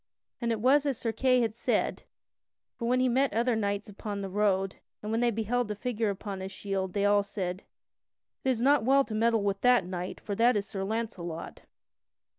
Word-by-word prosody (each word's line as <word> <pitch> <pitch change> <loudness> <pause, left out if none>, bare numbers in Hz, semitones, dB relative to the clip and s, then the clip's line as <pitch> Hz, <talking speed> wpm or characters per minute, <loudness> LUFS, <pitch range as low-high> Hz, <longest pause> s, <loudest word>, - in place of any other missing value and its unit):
(And 235 -1 0
it 225 - -1
was 275 +5 +4
as 270 -4 0
Sir 230 - -2
Kay 255 +1 +3
had 225 -2 0
said, 235 - 0 0.7
for 235 - -4
when 250 +1 +3
he 255 - +3
met 260 +1 +2
other 235 +2 +2
knights 205 0 -1
upon 205 0 -5
the 195 -1 -5
road, 195 -1 +1 0.3
and 210 - -3
when 225 - +1
they 240 - +3
beheld 230 +2 -1
the 210 - -3
figure 225 0 -1
upon 200 0 -5
his 190 0 -6
shield, 195 -2 -3
they 200 -1 +1
all 205 0 +4
said: 190 -2 -4 0.8
"It 265 - +1
is 240 -3 +1
not 280 -2 +4
well 275 +3 +4
to 220 - -7
meddle 225 0 +2
with 200 -1 -1
that 250 -5 +4
knight, 180 0 -5
for 205 - -5
that 230 +2 +4
is 200 - -2
Sir 195 -1 -5
Launcelot." 195 -6 -4
215 Hz, 210 wpm, -29 LUFS, 200-240 Hz, 0.8 s, was